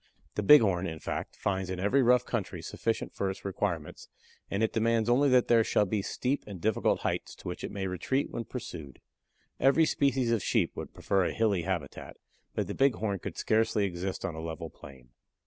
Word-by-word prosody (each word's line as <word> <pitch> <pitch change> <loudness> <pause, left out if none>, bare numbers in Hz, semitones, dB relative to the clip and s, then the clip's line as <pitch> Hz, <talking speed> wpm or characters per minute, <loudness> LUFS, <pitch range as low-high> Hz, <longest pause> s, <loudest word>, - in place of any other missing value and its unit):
The - - -1
Bighorn, 100 -7 +6
in 80 -1 -5
fact, - - -5
finds 95 -2 -2
in 95 -1 -3
every 105 +9 +3
rough 125 0 +4
country 90 -7 -3
sufficient 115 +7 -2
for 100 - -1
its 95 - -7
requirements, 90 -5 -3 0.4
and 100 +3 0
it 110 - +1
demands 115 0 +2
only 135 +4 +4
that 125 -1 +4
there 115 -1 +5
shall 105 - +2
be 100 +1 -1
steep 130 +7 -2
and 100 -3 -7
difficult 110 +3 +1
heights - - -2
to - - -11
which - - -5
it - - -3
may 100 -1 -4
retreat 95 +10 -1
when 115 - -4
pursued. 85 - -8 0.6
Every 140 +5 +5
species 135 -5 +1
of 115 -3 +2
sheep - - +1
would - - -7
prefer 95 -2 +1
a - - -1
hilly 105 -5 +1
habitat, 85 -6 -4 0.4
but - - 0
the - - -5
Bighorn 110 -7 +1
could - - -7
scarcely 110 -2 +2
exist 95 +1 -4
on 95 - -3
a 80 - -6
level 80 -1 -6
plain. 65 -3 -14
100 Hz, 200 wpm, -29 LUFS, 90-115 Hz, 0.6 s, Bighorn